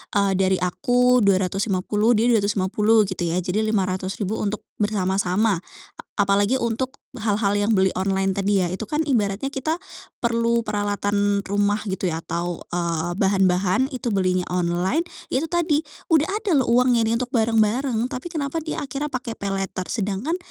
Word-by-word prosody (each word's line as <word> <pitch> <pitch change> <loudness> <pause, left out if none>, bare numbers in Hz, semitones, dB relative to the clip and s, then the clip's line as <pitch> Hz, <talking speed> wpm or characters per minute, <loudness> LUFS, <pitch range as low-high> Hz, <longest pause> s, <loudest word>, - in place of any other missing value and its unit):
eee, 200 -1 +3
dari 190 0 +3
aku 245 +8 +2
Rp250.000, 195 +2 +1
dia 230 +3 +3
Rp250.000 210 +1 +3
gitu 185 -3 -3
ya, 165 - -1
jadi 185 +3 -1
Rp500.000 195 -1 -1
untuk 210 0 -2 0.2
bersama-sama. 200 -1 +1 0.4
A - - -8 0.3
apalagi 205 +6 +2
untuk 235 +3 -1 0.2
hal-hal 205 -2 +1
yang 205 +2 +1
beli 190 -2 +3
online 190 0 0
tadi 200 0 +2
ya, 175 - 0
itu 190 +5 -4
kan 300 +6 -1
ibaratnya 235 -3 0
kita 310 +6 -2 0.4
perlu 235 0 +1
peralatan 205 -1 0
rumah 205 +1 0
gitu 190 0 -2
ya, 165 -1 -2
atau, 175 0 -3
eee, 170 -1 -1
bahan-bahan 190 +4 +2
itu 245 -4 -3
belinya 185 -2 +1
online, 180 - +1 0.3
ya 260 - +2
itu 325 - -4
tadi, 335 -3 +1 0.3
udah 315 +2 +4
ada 425 -3 -2
loh 250 - -2
uangnya 245 0 +4
ini 225 +1 +1
untuk 250 +2 -4
bareng-bareng, 225 +1 +2
tapi 255 +8 -5
kenapa 310 0 -3
dia 310 - -4
akhirnya 280 +3 -4
pakai 245 -3 -4
paylater, 195 -2 -3
sedangkan 215 - -2
205 Hz, 155 wpm, -23 LUFS, 190-240 Hz, 0.4 s, udah